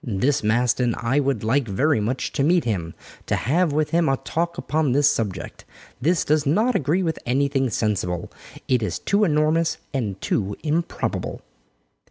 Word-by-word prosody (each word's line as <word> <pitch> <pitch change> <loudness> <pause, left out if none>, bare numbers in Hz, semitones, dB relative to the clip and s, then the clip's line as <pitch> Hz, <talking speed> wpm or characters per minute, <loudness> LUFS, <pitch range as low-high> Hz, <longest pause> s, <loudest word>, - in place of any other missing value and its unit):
This 120 +5 0
Maston, 120 +2 +2
I 125 +4 +1
would 140 -3 0
like 120 +3 +1
very 130 +7 +1
much 115 +5 -2
to 140 - 0
meet 170 +3 +3
him 85 -8 -3 0.3
to - - +1
have 165 +7 +1
with 150 +1 0
him 170 -2 +2
a 135 - +2
talk 170 +4 -3
upon 150 -4 0
this 145 +1 +4
subject. 100 -5 -4 0.4
This 165 +5 +2
does 150 0 +2
not 210 - +2
agree 160 - +1
with 160 -2 -2
anything 135 +1 +1
sensible, 95 -6 -2 0.4
it 125 -2 +2
is 105 - -2
too 200 +1 +1
enormous 155 -1 +2 0.2
and 105 -8 -2
too 100 0 -1
improbable." 165 +2 -2
140 Hz, 165 wpm, -23 LUFS, 115-155 Hz, 0.4 s, this